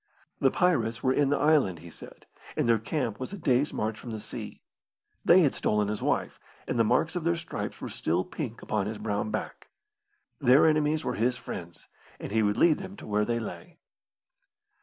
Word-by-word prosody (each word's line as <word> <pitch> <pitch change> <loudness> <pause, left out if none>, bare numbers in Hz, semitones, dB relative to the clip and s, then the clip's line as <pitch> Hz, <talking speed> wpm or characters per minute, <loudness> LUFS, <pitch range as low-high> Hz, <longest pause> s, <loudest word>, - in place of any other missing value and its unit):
The - - +4
pirates 120 -11 +1
were 130 - +3
in 140 -1 +2
the 145 - +2
island, 145 - +3
he 85 +2 -12
said, - - -13 0.3
and - - +1
their 115 -1 +4
camp 115 -2 -2
was 130 +9 -5
a - - -5
day's 140 -3 +2
march 110 +1 -2
from 120 - -9
the 110 -1 -4
Sea. - - -8 0.6
They 180 +2 +7
had 145 -6 +3
stolen 105 -1 0
his 105 - -3
wife, - - -1 0.3
and 120 - -1
the - - +6
marks 130 - +1
of 175 - -2
their 170 +1 +2
stripes 170 -1 -5
were - - -4
still 85 +3 0
pink 120 -2 -6
upon 105 -2 -1
his 110 0 -4
brown 105 0 -2
back. 110 0 -5 0.7
Their 135 +1 +6
enemies 155 0 +2
were - - 0
his 125 +3 0
friends, 85 -7 -8 0.3
and - - -6
he 110 +1 +2
would 105 -1 +1
lead 165 -1 +4
them 190 0 -8
to - - -11
where 105 0 +1
they 115 +1 0
lay. 110 - -8
120 Hz, 200 wpm, -28 LUFS, 105-150 Hz, 0.7 s, They